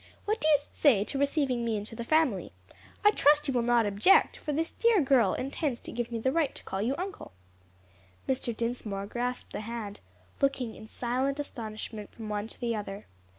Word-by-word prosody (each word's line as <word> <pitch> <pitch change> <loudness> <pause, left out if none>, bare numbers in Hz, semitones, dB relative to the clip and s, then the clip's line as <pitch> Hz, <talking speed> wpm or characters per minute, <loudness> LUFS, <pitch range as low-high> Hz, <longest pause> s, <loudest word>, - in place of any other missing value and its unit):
What 430 +2 0
do - - +2
you 305 -2 +7
say 275 -6 +2
to 270 +6 -4
receiving 280 -4 +1
me 225 -2 0
into 210 +2 -5
the 235 - -4
family? 250 - +1 0.5
I 415 - +9
trust 295 -5 +4
you 270 - 0
will 245 - +2
not 235 -1 +3
object, 205 - +4
for 300 - -4
this 320 +3 -1
dear 465 -3 +3
girl 270 -5 +4
intends 270 -1 -2
to - - -8
give 240 0 -3
me 230 - -2
the 260 +4 +1
right 310 -2 +1
to - - -11
call 190 +1 -3
you 245 +6 0
uncle." 380 - -6 0.9
Mr. 250 -3 -1
Dinsmore 225 -4 -3
grasped 245 +4 -3
the - - -3
hand, 215 -2 -6 0.4
looking 270 -4 +1
in 220 - -11
silent 260 +5 -1
astonishment 220 -5 -6
from 220 -2 -7
one 210 0 -2
to - - -16
the 235 -2 -1
other. 205 -1 -6
240 Hz, 195 wpm, -29 LUFS, 220-280 Hz, 0.9 s, I